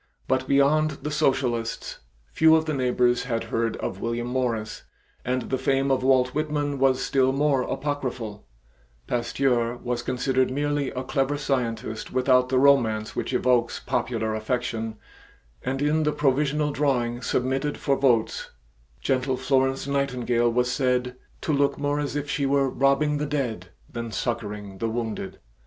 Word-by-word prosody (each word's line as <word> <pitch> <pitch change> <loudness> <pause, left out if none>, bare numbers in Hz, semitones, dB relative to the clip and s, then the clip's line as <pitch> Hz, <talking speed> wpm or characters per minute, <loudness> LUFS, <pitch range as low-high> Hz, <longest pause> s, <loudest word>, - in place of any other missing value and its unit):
But 130 0 0
beyond 150 +2 +3
the 150 - -3
socialists, 130 -6 -1 0.3
few 160 0 +6
of 160 0 +2
the 155 - -1
neighbors 125 -2 +1
had 115 -3 -1
heard 115 -1 0
of 95 - -5
William 115 0 -2
Morris, 120 -4 -2 0.4
and 125 0 -1
the 130 - -2
fame 135 +1 +1
of 135 - +2
Walt 130 -1 +3
Whitman 145 -1 -2
was 130 -1 +3
still 130 -1 +2
more 140 -1 +2
apocryphal; 130 -7 -4 0.6
Pasteur 120 0 0
was 120 0 -3
considered 130 +1 0
merely 145 +1 -1
a 130 - -4
clever 135 +2 0
scientist 115 -6 -2
without 125 0 +3
the 130 - +2
romance 115 -6 +3
which - - -2
evokes 125 -2 +1
popular 115 -3 -1
affection 115 0 -2 0.7
and 135 +2 -2
in 150 +2 +2
the 150 -1 +2
provisional 150 +1 +1
drawing 125 -5 0
submitted 135 +4 -1
for 140 - +1
votes, 120 -5 +1 0.5
gentle 130 0 0
Florence 135 0 +1
Nightingale 125 -4 +1
was 125 +1 +1
said 125 -1 0 0.3
"to 155 - -1
look 140 0 +2
more 145 0 0
as 145 0 -3
if 145 0 -2
she 140 -1 0
were 135 -1 +2
robbing 140 +2 +2
the 150 - -1
dead 120 -11 -2 0.2
than 115 -1 -6
succoring 105 -4 -4
the 115 - -1
wounded." 110 -4 -4
130 Hz, 150 wpm, -25 LUFS, 120-140 Hz, 0.7 s, few